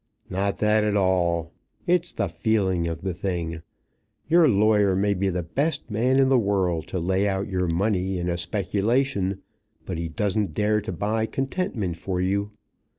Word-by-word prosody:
"Not 100 +2 -1
that 105 0 +3
at 105 -1 +1
all. 85 -3 +1 0.3
It's 175 0 +1
the 100 - -1
feeling 95 -1 0
of 80 -1 -4
the 95 -2 -1
thing. 85 -3 -3 0.7
Your 165 -1 +5
lawyer 105 -2 +3
may 100 +2 +2
be 100 0 0
the 90 -1 -2
best 140 - -2
man 125 +5 +2
in 135 -1 +5
the 130 -1 +4
world 95 -6 0
to 95 - -3
lay 95 +4 +1
out 95 0 -1
your 90 -2 -1
money 95 +2 0
in 90 0 -2
a 85 - 0
speculation, 100 +3 -1 0.4
but 90 -3 -4
he 85 - -2
doesn't 100 -2 -1
dare 105 0 +2
to 105 - -5
buy 110 +5 -1
contentment 135 - -2
for 90 +1 -3
you. 100 +3 0
100 Hz, 170 wpm, -25 LUFS, 90-110 Hz, 0.7 s, Your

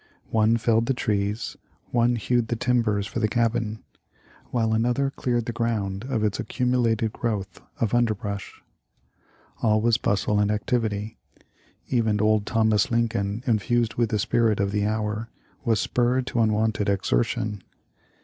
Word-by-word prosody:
One 110 +1 +3
felled 115 0 +2
the 135 - +1
trees; 105 -1 -1 0.3
one 120 0 +3
hewed 120 +1 0
the 120 - -1
tim 125 +1 +2
bers 105 -3 0
for 115 - -4
the 110 - +2
cabin; 115 -1 -1 0.7
while 115 -2 +1
another 125 +5 +1
cleared 120 -4 -1
the 120 - -2
ground 110 -3 -2
of 125 -5 -1
its 105 -2 0
accumulated 120 -3 0
growth 100 -6 -3 0.2
of 115 -1 0
underbrush. 105 -4 -1 1.0
All 110 -2 +3
was 115 0 +2
bustle 105 +1 +1
and 105 0 +2
activity. 105 -1 -1 0.7
Even 110 -4 +1
old 105 0 +2
Thomas 110 -3 +2
Lincoln, 115 -2 0
infused 115 0 +1
with 120 -2 0
the 105 - 0
spirit 110 0 +1
of 100 0 +1
the 105 0 0
hour, 110 +1 -2 0.3
was 115 -5 +2
spurred 125 +2 +1
to 120 - -2
unwonted 110 -1 +1
exertion. 100 - 0
110 Hz, 145 wpm, -25 LUFS, 105-120 Hz, 1.0 s, One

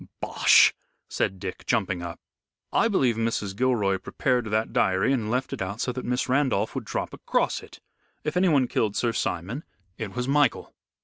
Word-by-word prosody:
"Bosh!" - - +5 0.3
said 95 - -1
Dick, 95 0 -6
jumping 95 -6 0
up. 85 -1 -6 0.5
"I 230 - +4
believe 130 - +2
Mrs. 115 -4 -1
Gilroy 105 -6 +1
prepared 125 +5 0
that 110 +1 -1
diary 95 +8 +2
and 115 -5 -1
left 125 +3 -1
it - - -5
out 100 +3 -4
so 125 - -1
that 125 +1 -5
Miss 125 +1 -1
Randolph 130 -6 +1
would - - -4
drop - - -3
across - - -1
it. - - -14 0.4
If 150 +2 -3
anyone 160 -8 +3
killed 105 -3 0
Sir 120 -2 0
Simon 100 - -3 0.4
it 110 -2 -5
was 125 0 -2
Michael." 145 +1 +1
115 Hz, 175 wpm, -26 LUFS, 100-130 Hz, 0.5 s, Bosh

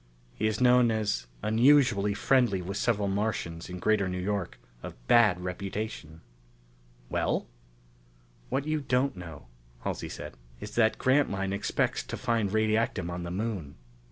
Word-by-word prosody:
He 110 - -1
is 110 - -1
known 125 -1 +5
as 105 - -1 0.2
unusually 115 -3 +4
friendly 125 -7 +2
with 90 +2 -5
several 105 -4 +1
Martians 95 -5 -2
in 90 - -6
Greater 100 0 +1
New 90 - -3
York 95 -7 -2 0.2
of - - -8
bad 105 -7 +5
reputation." 90 -3 -5 0.9
"Well?" - - 0 1.0
"What 140 - -1
you 155 0 -1
don't 130 -1 +1
know," 85 -7 -9 0.4
Halsey - - -4
said, - - -8 0.2
"is - - -8
that 110 -2 +3
Grantline 100 -8 +1
expects 100 - 0
to - - -5
find 115 -5 0
radiactum 110 -4 +1
on 90 +1 -4
the 85 - -5
Moon." 95 -6 -4
105 Hz, 140 wpm, -28 LUFS, 90-115 Hz, 1.0 s, known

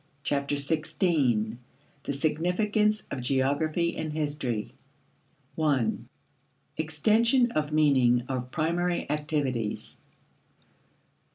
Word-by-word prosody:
Chapter 140 0 0
Sixteen: 140 - 0 0.5
The - - -2
Significance 180 +9 +1
of 135 - -3
Geography 145 +6 0
and 155 - -3
History 145 -7 -2 0.8
1. 145 -7 0 0.7
Extension 220 - +2
of 150 -4 -1
Meaning 130 -6 +4
of 125 -1 -3
Primary 170 +5 -1
Activities. 145 -7 -2
150 Hz, 80 wpm, -27 LUFS, 130-165 Hz, 0.8 s, Meaning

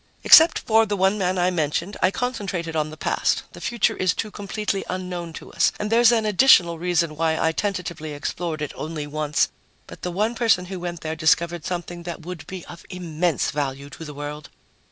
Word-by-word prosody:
"Except 325 +1 +8
for 225 0 +3
the 205 -1 -1
one 190 +2 +2
man 185 0 0
I 180 +1 +2
mentioned, 170 +3 -1
I 185 - +5
concentrated 195 -9 -3
on 155 -1 0
the 155 - -10
past - - 0
the - - -11
future 235 -3 +1
is 185 -2 +1
too 215 - -4
completely 205 -1 -3
unknown 180 -2 -4
to - - -10
us. - - +3
And 210 +1 -3
there's 235 0 +6
an 225 -2 +2
additional 190 -6 +5
reason 170 -2 0
why 160 0 +1
I 160 - +2
tentatively 175 -5 -3
explored 155 +1 -4
it 150 - -5
only 155 -1 -5
once. 150 0 0 0.4
But - - -12
the 180 - -3
one 210 +6 0
person 225 -6 +2
who 185 0 -6
went 175 -2 -5
there 160 0 -3
discovered 165 +1 +1
something 175 -1 -4
that 170 -1 -7
would 180 -3 -7
be 185 -2 -7
of 170 -1 -11
immense 175 -3 -1
value 140 -1 -3
to 165 - -9
the 150 -2 -8
world." 145 +1 -7
175 Hz, 200 wpm, -23 LUFS, 160-195 Hz, 0.4 s, Except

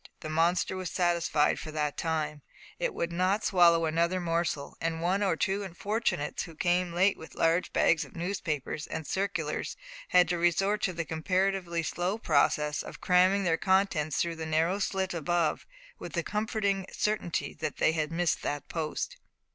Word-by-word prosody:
The 155 - -5
monster 170 +4 +2
was 185 -2 -4
satisfied 170 -4 +1
for - - -7
that 150 -2 -1
time; 155 -2 -2 0.4
it - - 0
would 170 - -2
not 185 +4 +1
swallow 170 -3 +5
another 170 +3 +1
morsel, 170 -4 -1
and 165 0 -1
one 180 +4 +1
or 195 -5 +2
two 195 +4 0
unfortunates 200 -4 -2
who 165 - -8
came 175 +2 +1
late 190 +4 +2
with 160 - -11
large 165 +2 +2
bags 165 - +3
of - - -14
newspapers 165 -5 -3
and 160 - -5
circulars 200 +4 -2 0.3
had 180 -1 +5
to 175 -1 0
resort 195 +5 +2
to 185 - -1
the 170 -1 -3
comparatively 180 +1 0
slow 180 +5 -1
process 150 -4 +2
of - - -9
cramming 185 +2 +4
their 165 -3 +2
contents 190 -6 +1
through 170 -1 -1
the 160 0 -4
narrow 165 +5 +1
slit 190 -2 -1
above, 170 0 0 0.3
with - - -8
the - - -1
comforting 210 -3 -1
certainty 210 -5 -1
that 155 - -4
they - - +3
had 155 -1 -2
missed 170 0 0
that 145 -1 -3
post. 165 - -3
175 Hz, 170 wpm, -29 LUFS, 160-190 Hz, 0.4 s, swallow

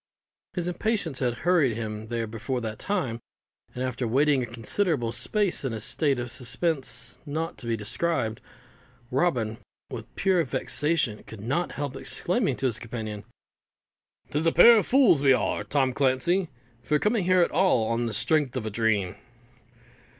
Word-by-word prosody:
His 175 -2 -2
impatience 180 - -1
had 125 -3 0
hurried 160 -10 +3
him 110 -1 -5
there 115 0 -2
before 115 +4 -4
that 110 -1 -5
time, 130 - -1 0.6
and 125 - -3
after 130 -1 -2
waiting 140 +3 +3
a 120 - -3
considerable 120 - -1
space 175 - 0
in 130 -4 -2
a 110 - -4
state 140 +5 +1
of 120 -1 -4
suspense 135 +4 -2
not 160 +3 -3
to 120 - -6
be 115 -1 0
described, 110 0 -2 0.7
Robin, 125 -7 0 0.3
with 115 -2 -8
pure 185 -3 +2
vexation, 150 -9 0
could 110 -3 -10
not 140 +11 -1
help 140 -2 -4
exclaiming 180 - 0
to 135 - -2
his 120 -4 0
companion, 110 -3 -6 1.1
"'Tis 155 +3 0
a - - +4
pair 230 +8 +8
of - - -3
fools 235 - +5
we 135 -2 +6
are, - - 0
Tom 135 -3 +1
Clancey, 140 +8 +1 0.3
for 150 +5 +1
coming 210 +3 +1
here 185 0 +4
at 170 - +2
all 165 -9 +3
on 115 +1 -1
the 115 - -4
strength 145 +1 +1
of 115 - -3
a 110 - -3
dream." 105 -4 0
130 Hz, 165 wpm, -26 LUFS, 115-170 Hz, 1.1 s, pair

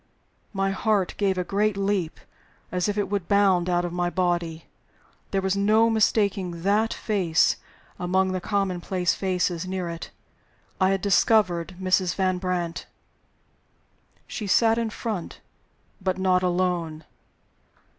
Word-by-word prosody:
My 195 -1 0
heart 200 -1 0
gave 195 -2 +1
a 180 - 0
great 205 +2 0
leap 195 -4 -1 0.5
as 180 +2 0
if 205 - -2
it 205 - 0
would 200 -4 -2
bound 190 -3 +3
out 175 0 +1
of 175 - -5
my 175 0 0
body. 175 -3 -1 0.6
There 195 -1 -1
was 190 0 +1
no 215 +3 +3
mistaking 200 -6 +1
that 210 +3 +2
face 185 -7 +1 0.4
among 185 +1 +1
the 185 -1 -2
commonplace 185 -2 0
faces 180 -2 -1
near 185 -2 -3
it. 165 0 -7 0.7
I 185 0 +4
had 195 -1 0
discovered 190 -3 +2
Mrs. 185 -1 +1
Van 185 -1 0
Brandt! 180 -2 -3 1.4
She 210 - -5
sat 225 +3 +4
in 230 -1 -1
front 215 -5 -5 0.6
but 185 0 -1
not 185 -1 +2
alone. 175 -3 -1
185 Hz, 135 wpm, -25 LUFS, 175-200 Hz, 1.4 s, I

